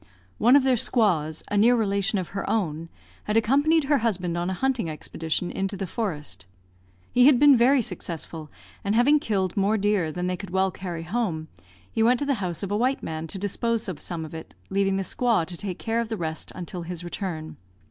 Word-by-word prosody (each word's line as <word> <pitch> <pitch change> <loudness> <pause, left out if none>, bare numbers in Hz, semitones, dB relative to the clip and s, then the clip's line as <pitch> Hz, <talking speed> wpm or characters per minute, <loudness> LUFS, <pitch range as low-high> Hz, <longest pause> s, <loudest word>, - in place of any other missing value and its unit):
One 245 +4 +6
of 285 - +6
their 260 -2 +3
squaws, 170 - +1
a 205 - 0
near 235 +4 +5
relation 200 -1 +1
of 185 -3 -3
her 200 - -4
own, 165 -6 -1 0.4
had 210 +1 +1
accompanied 285 +8 +3
her 285 0 +2
husband 185 -7 -1
on 175 +1 -1
a - - -1
hunting 255 -6 0
expedition 160 +2 -3
into 195 +1 -3
the 195 - -3
forest. 150 - -4 0.6
He 250 +1 +6
had 285 -4 +7
been 290 +1 +7
very 250 +2 +4
successful, 165 -4 -5 0.3
and 205 +2 0
having 280 +6 +5
killed 195 -8 -1
more 205 +2 +2
deer 200 -5 +1
than 180 +3 -3
they 180 0 -1
could 200 -1 -8
well 190 +1 +1
carry 175 -4 -6
home, 175 -5 -2 0.4
he - - -1
went 240 +3 +5
to 285 - -1
the 280 - +2
house 175 -1 -3
of 195 - -3
a 205 - +1
white 255 +4 0
man 160 0 -4
to 160 - -5
dispose 220 +4 -1
of 180 -6 -5
some 165 -3 -4
of 155 - -11
it, 160 0 -9 0.2
leaving 195 0 +2
the 195 - -1
squaw 230 -4 +1
to 175 - -7
take 185 0 -5
care 225 0 -1
of 230 -1 -2
the 220 - -3
rest 160 -3 -4
until 180 0 -6
his 175 0 -5
return. 175 -3 -5
195 Hz, 215 wpm, -25 LUFS, 170-230 Hz, 0.6 s, had